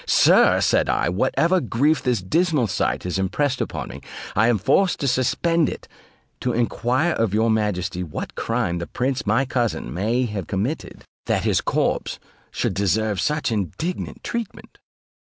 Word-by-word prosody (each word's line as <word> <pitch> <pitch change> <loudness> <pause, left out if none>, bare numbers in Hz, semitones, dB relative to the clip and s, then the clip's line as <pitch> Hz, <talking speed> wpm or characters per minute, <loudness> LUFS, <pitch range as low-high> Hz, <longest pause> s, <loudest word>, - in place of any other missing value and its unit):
"Sir," - - +5
said - - +2
I, - - +1
"whatever 165 - +2
grief 140 +6 +1
this 120 -7 0
dismal 155 - +2
sight 100 - -1
has 90 +1 -2
impressed 130 +8 0
upon - - -4
me, - - -9 0.3
I 110 +3 +4
am 120 -2 +3
forced 185 - +2
to 140 - 0
suspend 150 +6 +2
it, - - -8 0.5
to 125 - -1
enquire 125 +6 +1
of 110 -3 0
your 110 +1 +3
majesty 100 -5 -1
what 80 -4 -5
crime 85 0 -1
the 85 - -5
prince 130 0 -2
my 115 +6 +2
cousin 120 - -2
may 115 +8 0
have 105 -6 -4
committed, 110 +10 -3 0.2
that - - +1
his - - +2
corpse - - -1 0.3
should - - -2
deserve 100 +1 0
such 150 -4 0
indignant 105 - -3
treatment?" 235 -3 -6
115 Hz, 155 wpm, -22 LUFS, 100-145 Hz, 0.5 s, Sir